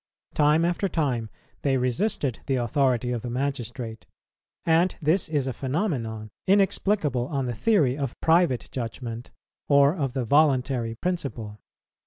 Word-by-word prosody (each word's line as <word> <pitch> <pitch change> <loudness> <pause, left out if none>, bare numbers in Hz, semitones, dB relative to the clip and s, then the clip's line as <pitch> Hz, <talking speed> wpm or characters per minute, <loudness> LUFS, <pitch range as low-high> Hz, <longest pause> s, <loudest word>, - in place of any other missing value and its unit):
Time 150 +2 +3
after 175 +3 0
time 130 - -1 0.3
they 135 -2 +2
resisted 130 - 0
the 135 - +1
authority 125 0 +1
of 120 -2 -2
the 120 - -5
magistrate; 120 -3 -4 0.6
and 170 +2 +3
this 165 +2 +1
is 145 -4 0
a 130 - -2
phenomenon 125 - -3 0.2
inexplicable 190 - +2
on 140 -3 -2
the 120 - -2
theory 145 - +2
of 135 -4 -4
Private 165 -6 +2
Judgment 120 -1 -5 0.4
or 140 +2 +5
of 140 -7 -2
the 130 -3 -2
Voluntary 130 -4 +2
Principle. 115 -10 -4
135 Hz, 135 wpm, -25 LUFS, 120-160 Hz, 0.6 s, or